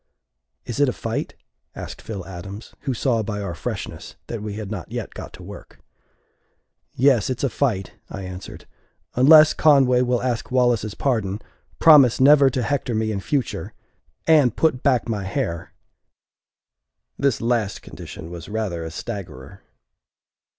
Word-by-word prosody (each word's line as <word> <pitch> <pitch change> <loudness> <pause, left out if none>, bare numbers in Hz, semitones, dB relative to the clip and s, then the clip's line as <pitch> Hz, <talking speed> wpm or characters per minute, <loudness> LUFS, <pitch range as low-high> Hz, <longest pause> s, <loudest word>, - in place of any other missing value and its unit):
"Is 120 - -5
it 145 -2 +4
a - - -2
fight?" 115 0 -4 0.4
asked - - -8
Phil 100 -5 -6
Adams, 95 +4 -9
who 135 - 0
saw 115 -1 +1
by 105 -1 -4
our 100 -4 -4
freshness - - -6
that 115 -3 -5
we 105 -1 -5
had 105 -1 -6
not 95 -6 -6
yet - - -5
got - - -8
to - - -12
work. - - -11 1.2
"Yes, 130 -4 +3
it's 130 +1 -3
a 135 - +1
fight," 110 -9 -1 0.2
I 100 - -6
answered, 90 0 -9 0.5
"unless 155 +4 +7
Conway 135 -5 +4
will 125 -1 0
ask 120 -3 -2
Wallace's 120 -5 +1
pardon, 110 -7 -1 0.4
promise 145 -7 +7
never 140 +1 +7
to 125 -1 -2
hector 135 -4 -1
me 110 0 0
in 100 - -2
future 135 +6 -2 0.5
and 150 -8 +4
put 155 -6 +2
back 130 -5 +2
my 105 -4 -2
hair!" 95 -5 -3 1.5
This 140 -5 +1
last 115 -4 -1
condition 85 - -10
was 85 0 -8
rather 105 -6 -3
a 80 - -5
staggerer. 85 -1 -8
115 Hz, 150 wpm, -22 LUFS, 100-130 Hz, 1.5 s, unless